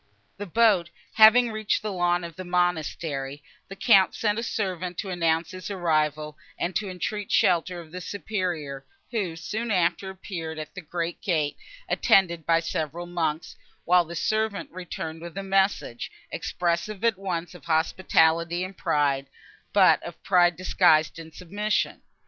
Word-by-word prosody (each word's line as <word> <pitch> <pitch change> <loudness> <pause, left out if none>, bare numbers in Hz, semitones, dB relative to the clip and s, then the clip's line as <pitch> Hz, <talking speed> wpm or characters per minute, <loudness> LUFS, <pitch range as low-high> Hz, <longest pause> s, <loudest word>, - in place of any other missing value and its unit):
The 205 0 -6
boat 195 -3 +3 0.2
having 230 +2 +7
reached 215 -1 -1
the 210 -2 -3
lawn 175 -1 +1
before 170 -1 -7
the 185 - -5
monastery, 155 -5 -1 0.2
the 195 - -9
Count 195 -2 +4
sent 210 0 0
a - - -1
servant 185 -6 -3
to 195 - -4
announce 165 -2 0
his 185 +1 -7
arrival, 155 -4 0 0.2
and 175 +1 -2
to 210 -2 -1
entreat 200 +3 -4
shelter 175 0 +2
of 160 -2 -12
the 180 +1 -6
Superior, 175 -8 -3 0.3
who, 195 -8 -2
soon 215 +8 -4
after, 180 -1 +1
appeared 175 -4 -6
at 155 0 -7
the 180 - -7
great 170 +1 -4
gate, 155 -7 0 0.3
attended 170 -5 +3
by 165 0 +4
several 165 +1 -3
monks, 165 -2 -2 0.3
while 180 0 +5
the 170 +1 -8
servant 215 +3 -1
returned 165 -3 -6
with 170 +2 -9
a 195 - -3
message, 195 -10 0 0.2
expressive 180 +4 -2
at 230 -5 +2
once 175 -3 -3
of 175 - -14
hospitality 165 +1 +2
and 185 +1 -8
pride, 140 -2 +1 0.4
but - - +5
of - - -10
pride 175 -2 +4
disguised 165 -3 +3
in 160 0 -10
submission. 205 +6 -2
175 Hz, 155 wpm, -26 LUFS, 165-195 Hz, 0.4 s, having